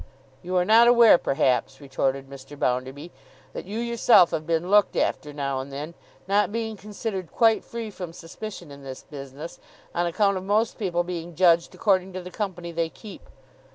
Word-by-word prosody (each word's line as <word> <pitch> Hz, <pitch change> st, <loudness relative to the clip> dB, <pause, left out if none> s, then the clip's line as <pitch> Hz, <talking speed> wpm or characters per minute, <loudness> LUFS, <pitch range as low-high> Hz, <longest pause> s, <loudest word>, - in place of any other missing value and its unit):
You 180 Hz, +1 st, -4 dB
are 180 Hz, 0 st, +3 dB
not 225 Hz, +3 st, +6 dB
aware 235 Hz, -6 st, +7 dB
perhaps,' 135 Hz, -2 st, 0 dB
retorted 135 Hz, -1 st, -2 dB
Mr. 140 Hz, +1 st, -11 dB
Bounderby, 130 Hz, +6 st, -2 dB, 0.4 s
'that -, -, -6 dB
you 205 Hz, +4 st, -5 dB
yourself 235 Hz, -5 st, +4 dB
have 155 Hz, 0 st, -3 dB
been 170 Hz, +2 st, -1 dB
looked 205 Hz, -1 st, +4 dB
after 150 Hz, -, -1 dB
now 140 Hz, -2 st, -3 dB
and 135 Hz, +1 st, -7 dB
then, 150 Hz, +4 st, -6 dB, 0.3 s
not 205 Hz, +1 st, +2 dB
being 225 Hz, 0 st, -3 dB
considered 200 Hz, -3 st, -6 dB
quite 225 Hz, -2 st, +3 dB
free 230 Hz, -2 st, -6 dB
from 180 Hz, -4 st, -7 dB
suspicion 175 Hz, 0 st, -9 dB
in 140 Hz, 0 st, -11 dB
this 130 Hz, -1 st, -8 dB
business, 140 Hz, +2 st, -9 dB, 0.3 s
on 175 Hz, 0 st, 0 dB
account 195 Hz, +3 st, +1 dB
of 185 Hz, -, -5 dB
most 215 Hz, +3 st, 0 dB
people 175 Hz, -4 st, 0 dB
being 175 Hz, -1 st, -6 dB
judged 170 Hz, -1 st, +3 dB
according 190 Hz, -2 st, +1 dB
to 185 Hz, -, -5 dB
the 180 Hz, -, -9 dB
company 180 Hz, -5 st, -4 dB
they 165 Hz, 0 st, -1 dB
keep. 185 Hz, +8 st, -13 dB
175 Hz, 180 wpm, -25 LUFS, 150-205 Hz, 0.4 s, aware